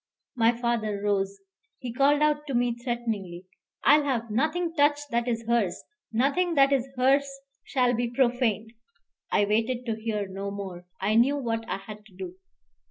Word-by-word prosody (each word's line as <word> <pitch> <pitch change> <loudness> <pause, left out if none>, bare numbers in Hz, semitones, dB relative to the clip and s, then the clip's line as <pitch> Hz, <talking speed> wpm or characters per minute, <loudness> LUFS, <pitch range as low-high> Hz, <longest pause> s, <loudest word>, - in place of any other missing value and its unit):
My 230 -1 +4
father 235 -3 -1
rose. 200 -1 -1 0.4
He 245 -3 -6
called 285 +3 +3
out 300 0 +1
to 270 - -2
me 240 0 +2
threateningly, 225 -7 -4 0.4
"I 300 - +7
will 295 - -2
have 235 -5 -1
nothing 320 +8 0
touched 290 -1 +2
that 235 +1 0
is 230 -1 -2
hers. 230 -6 0 0.3
Nothing 285 +9 +1
that 275 0 +5
is 270 -1 0
hers 275 +2 +3 0.3
shall 250 -2 +1
be 240 0 -1
profaned 240 -3 0 0.3
" - - -46
I 205 - +3
waited 230 +4 0
to 220 -2 -3
hear 210 -3 -2
no 195 +1 -5
more; 190 -3 -7
I 200 +3 +1
knew 250 +6 +4
what 225 -4 -3
I - - -1
had 210 +2 -10
to 190 - -21
do. 360 - -7
235 Hz, 175 wpm, -27 LUFS, 215-275 Hz, 0.4 s, I